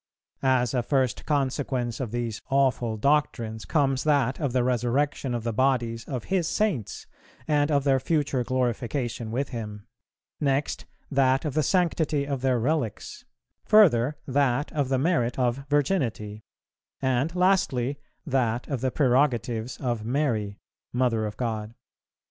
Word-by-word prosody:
As 130 -3 +2
a 125 - +2
first 130 0 0
consequence 130 -4 -1
of 130 -4 -3
these 115 -2 -3
awful 130 -4 +1
doctrines 115 -4 0
comes 135 -4 +1
that 140 -4 +2
of 145 -5 -1
the 125 0 +1
resurrection 125 +2 0
of 115 - -3
the 115 -1 -2
bodies 120 -2 0
of 125 -5 -4
His 185 -4 0
Saints, 175 - -1 0.4
and 145 -1 +2
of 140 -2 +2
their 135 -2 +3
future 145 -2 0
glorification 120 -1 -2
with 130 +5 -2
Him; 105 -4 -6 0.5
next, 140 0 0 0.3
that 135 0 +2
of 150 - -2
the 155 - +2
sanctity 160 -4 +1
of 140 -2 -3
their 130 -2 +2
relics; 125 -3 -2 0.4
further, 150 - +5
that 140 0 +1
of 145 -4 0
the 135 - +2
merit 130 -5 +1
of 130 +1 0
Virginity; 130 - 0 0.6
and, 130 +5 0
lastly, 150 -8 +1 0.3
that 125 -4 0
of 135 -5 -2
the 130 - +1
prerogatives 125 -4 +1
of 120 -5 -2
Mary, 115 -5 -1 0.3
Mother 120 -3 +1
of 105 - -8
God. 110 -2 -3
130 Hz, 140 wpm, -26 LUFS, 120-145 Hz, 0.6 s, further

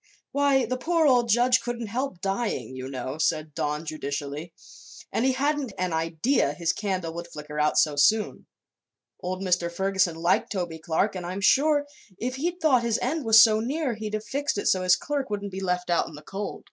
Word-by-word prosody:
"Why, 280 -2 +3
the 255 +3 -2
poor 330 +3 +2
old 245 -4 +4
judge 245 +2 +4
couldn't 240 -1 -4
help 235 -3 -4
dying, 195 - -2
you 130 0 -6
know," 130 +2 -5
said 155 -1 0
Don, 150 +2 -2
judicially. 150 +1 -5 0.6
"And 240 - 0
he 265 - +3
hadn't 280 -3 -1
an 185 -2 -1
idea 165 - +1
his 170 +1 0
candle 185 -5 -3
would 170 +1 -6
flicker 150 -2 -7
out 150 0 +2
so 150 -2 +3
soon. 210 +10 +2 0.7
Old 185 +1 -4
Mr. 180 -2 +1
Ferguson 190 -1 +1
liked 170 +2 +1
Toby 175 -5 -3
Clark 165 +6 0
and 185 - -4
I'm 180 +3 -4
sure, 290 +7 +3 0.3
if 255 +4 -3
he'd 345 +5 -2
thought 290 -7 +4
his 235 -1 0
own 250 - -1
end 300 - -5
was 225 0 +7
so 220 -1 +4
near, 270 +3 -1
he'd 215 -1 -4
have 215 0 -5
fixed 280 0 -2
it 205 - -3
so 185 - +3
his 180 0 +5
clerk 285 -2 -3
wouldn't 205 -1 -4
be 190 +1 -5
left 180 -1 -1
out 170 - +2
in 160 - -10
the 150 - -12
cold." 195 +5 -5
195 Hz, 205 wpm, -26 LUFS, 165-250 Hz, 0.7 s, was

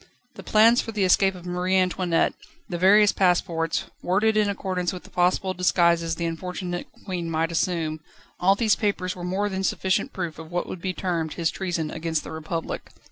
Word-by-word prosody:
The - - -10
plans 225 +3 +5
for 225 - -6
the 210 -3 0
escape 190 +1 +4
of 180 -1 -11
Marie 180 +1 0
Antoinette, 180 -2 +1 0.3
the 175 -5 -4
various 205 +3 +6
passports, 170 -3 +1 0.2
worded 210 +5 +2
in 210 -1 +3
accordance 185 -3 -2
with 180 -2 -8
the - - -16
possible 180 +1 +1
disguises 170 -2 +2
the 170 - -3
unfortunate 175 +1 -4 0.2
Queen 180 -4 -3
might 165 +1 0
assume 165 -2 -1 0.4
all 190 +2 +4
these 220 0 +3
papers 190 -3 -1
were 180 - -8
more 190 +3 -1
than 190 -1 -3
sufficient 190 0 0
proof 170 -4 -5
of 160 -1 -9
what 175 0 -1
would 180 - -7
be 185 - -1
termed 170 -4 -2
his 165 -2 0
treason 170 -5 -3
against 160 -1 -2
the - - -8
Republic. 160 +1 -5
180 Hz, 190 wpm, -25 LUFS, 170-190 Hz, 0.4 s, various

